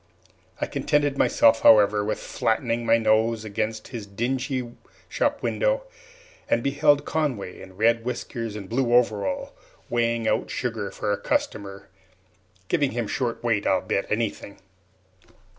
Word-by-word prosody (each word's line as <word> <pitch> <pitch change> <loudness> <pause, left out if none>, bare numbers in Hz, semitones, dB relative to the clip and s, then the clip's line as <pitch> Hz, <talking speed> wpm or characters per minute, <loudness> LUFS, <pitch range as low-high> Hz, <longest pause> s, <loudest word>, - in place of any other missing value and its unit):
I - - 0
contented 145 -1 0
myself, 115 -4 +4
however, 105 -1 +6
with 105 - -1
flattening 115 0 -1
my 115 - +5
nose 110 0 +2
against 110 +1 -3
his 115 -5 -7
dingy 125 +4 -2 0.4
shop - - -1
window, - - +1 0.7
and 115 - +2
beheld 145 +1 +3
Conway, 130 -13 -2
in 95 -1 -13
red 115 +2 +3
whiskers 115 -2 -4
and 100 -3 -7
blue 120 +1 +1
overalls, 110 -5 +1 0.4
weighing 115 -1 0
out - - 0
sugar 115 -5 -3
for 105 - -3
a 100 0 -2
customer 100 -2 -2 0.8
giving 145 - +1
him 120 -1 -1
short 120 0 -2
weight, 115 -4 +1
I'll 95 - +3
bet 100 +1 -2
anything! 105 -2 -2
115 Hz, 135 wpm, -25 LUFS, 105-125 Hz, 0.8 s, however